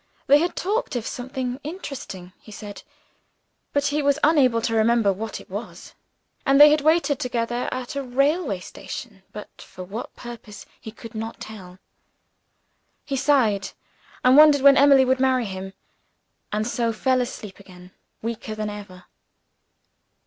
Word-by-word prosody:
They 285 +2 +6
had 340 +2 -1
talked 415 - -2
of 235 -2 -3
something 255 0 -4
interesting, 275 - -8
he 215 - -14
said 205 -1 -9 0.9
but 285 0 0
he 300 - +1
was 285 0 +2
unable 275 -7 +4
to 225 0 -2
remember 225 -2 +3
what 220 +3 -6
it - - -15
was. - - -8 0.5
And 275 +1 +3
they 295 0 +10
had 300 0 +3
waited 310 -2 +2
together 240 -1 -2
at 255 +1 -5
a 280 - -1
railway 275 - 0
station 205 +1 -9
but 210 - -11
for 185 - -10
what 200 +6 -7
purpose 235 -3 -10
he 220 - -9
could 230 +1 -12
not 225 +1 -6
tell. 185 -4 -10 1.3
He 275 - -3
sighed 255 -8 +1 0.5
and 255 +1 +6
wondered 300 -1 +7
when 280 0 +7
Emily 275 -1 +6
would 260 0 +1
marry 260 -2 +2
him 190 -1 -7 0.8
and 215 +1 -1
so 235 -1 -1
fell 255 +3 +1
asleep 210 -5 -7
again, 180 -2 -15 0.3
weaker 225 -1 -5
than 215 -1 -3
ever. 200 -3 -11
245 Hz, 150 wpm, -23 LUFS, 210-275 Hz, 1.3 s, they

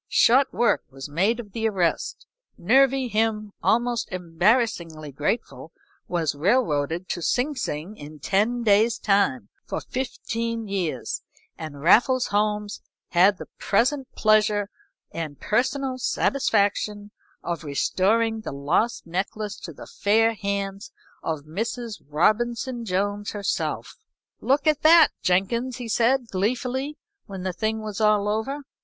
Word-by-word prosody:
Short 260 +4 +4
work 240 - +2
was 135 +1 -8
made 195 +11 +1
of 210 -4 -8
the 225 +2 0
arrest; 180 -5 -1 0.3
Nervy 270 -1 +3
Him, 215 -2 0
almost 235 0 +1
embarrassingly 170 - 0
grateful, 150 - -3 0.4
was 165 -4 0
railroaded 165 - +1
to 175 - -3
Sing 250 - 0
Sing 170 - -4
in 150 +1 -10
ten 215 - 0
days' 220 +1 +4
time, 195 - +1
for - - -4
fifteen 230 -3 -4
years, 180 -10 -3 0.3
and 150 -3 -8
Raffles 245 - +5
Holmes 210 0 0 0.3
had 185 +3 +4
the - - -8
present 255 +6 +1
pleasure 210 -1 +2 0.4
and 155 -4 -5
personal 260 +3 0
satisfaction 210 -5 0 0.3
of 170 -1 -3
restoring 220 +10 +1
the - - -6
lost 160 +12 0
necklace 195 +4 -4
to 170 - -8
the 150 - -11
fair 225 +3 +2
hands 200 -1 -4 0.3
of 155 -2 -3
Mrs. 220 - -5
Robinson 235 - 0
Jones 205 +1 -1
herself. 205 -1 -3 0.4
"Look 275 +2 +1
at 305 -2 +2
that, 325 0 +7
Jenkins!" 230 +7 0
He 245 -2 -6
said, 235 +2 +2
gleefully, 250 +8 -1 0.3
when 195 -2 -7
the 185 -1 -2
thing 220 +2 -2
was 215 0 -5
all 210 -1 +3
over. 220 +8 -2
210 Hz, 125 wpm, -24 LUFS, 180-235 Hz, 0.4 s, that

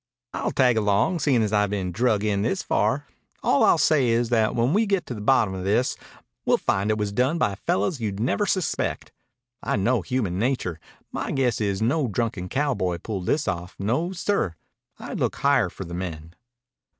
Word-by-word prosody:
"I'll - - -1
tag 125 -4 +3
along, 105 - +2
seein' 135 -6 +2
as 105 0 -1
I've 105 -1 +3
been 95 -3 -2
drug 110 +1 +1
in 100 -2 +1
this 185 - -1
far. 125 +8 0 0.4
All - - +3
I'll - - +5
say 140 -6 +3
is 115 0 +1
that 110 -3 +2
when 120 +5 +2
we 215 +2 +2
get 195 -2 0
to - - -5
the 105 - -7
bottom 110 -4 +3
of 95 -1 -5
this, 105 +6 +1 0.5
we'll - - +3
find 100 +2 0
it 110 - +1
was 105 -1 -2
done 130 +9 +1
by 105 -11 +1
fellows 100 - -1
you'd 100 -3 -3
never 165 - 0
suspect. 185 -4 -1 0.5
I - - -1
know 110 +3 +1
human 95 -3 -2
nature. 110 -9 -1 0.3
My - - -3
guess 125 -5 0
is 100 0 0
no 135 +4 +1
drunken 105 -4 -2
cowboy 120 -11 0
pulled 95 0 -5
this 155 0 +1
off. 90 0 -3
No, 125 - -1
sir. 180 - -1 0.4
I'd - - -6
look - - 0
higher - - +2
for - - -8
the 85 - -8
men." 85 -3 -6
110 Hz, 195 wpm, -24 LUFS, 100-130 Hz, 0.5 s, I'll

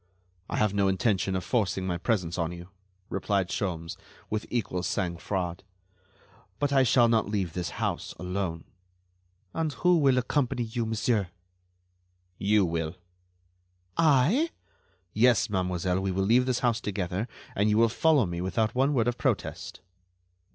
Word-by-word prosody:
"I - - -2
have 105 -2 +2
no 100 -1 +2
intention 95 0 +1
of 90 - -2
forcing 100 -6 0
my 90 -2 -2
presence 90 -5 -1
on 85 0 -1
you," 90 +1 -9 0.4
replied 95 0 0
Sholmes, 85 -6 -3 0.3
with 110 0 -2
equal 110 -7 -1
sang 90 -1 -1
froid, 90 -1 -3 1.0
"but 145 +2 0
I 135 - +5
shall 125 -1 +5
not 110 -3 +2
leave 95 -6 -1
this 90 -1 -3
house - - -2
alone." 90 -3 -3 0.9
"And 160 -2 -1
who 180 +6 +3
will 135 -4 +4
accompany 125 0 0
you, 115 0 -3
monsieur?" 110 -2 0 1.1
"You 105 0 +3
will." 80 0 -2 1.0
"I?" 165 - +4 0.6
"Yes, 115 -1 +3
mademoiselle, 90 -1 0
we 95 0 -1
will 95 +1 0
leave 125 +5 +4
this 125 -2 0
house 115 -2 +1
together, 95 +1 -2 0.3
and 105 +2 +2
you 105 - +3
will 115 +1 +5
follow 145 +2 +3
me 85 -1 -4
without 110 +4 0
one 135 +3 +2
word 120 -2 +2
of 120 0 -1
protest." - - -2
105 Hz, 150 wpm, -28 LUFS, 90-120 Hz, 1.1 s, I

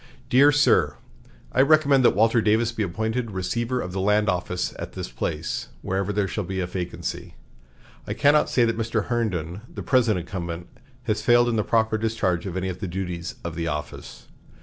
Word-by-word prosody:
"DEAR 140 +4 +7
SIR: 90 - +3 0.6
I 130 - +3
recommend 140 -2 +4
that - - +5
Walter 115 +2 +4
Davis 110 +2 +2
be 115 - -4
appointed 110 +5 -2
Receiver 115 +6 -2
of 90 - -5
the 95 +1 -2
Land 105 +1 +2
Office 90 0 -2
at - - -6
this - - -6
place, - - -3 0.2
whenever 95 +1 -1
there 105 -1 0
shall 105 - -3
be 95 +1 -4
a 90 - 0
vacancy. 90 -1 -5 0.7
I - - -3
cannot 145 +1 +4
say 120 - +3
that 115 0 -1
Mr. 115 -2 -1
Herndon, 95 -7 -2
the - - -7
present 120 -6 +3
incumbent, 85 -1 -5 0.4
has 110 -2 -1
failed 120 +1 +4
in 115 - 0
the 105 - +1
proper 110 0 +1
discharge 100 -5 -1
of 95 -1 -4
any 95 0 -2
of 90 - -6
the 100 - -4
duties 90 -1 -4
of 85 - -4
the 85 0 -3
office. 75 -2 -6
105 Hz, 190 wpm, -24 LUFS, 90-115 Hz, 0.7 s, DEAR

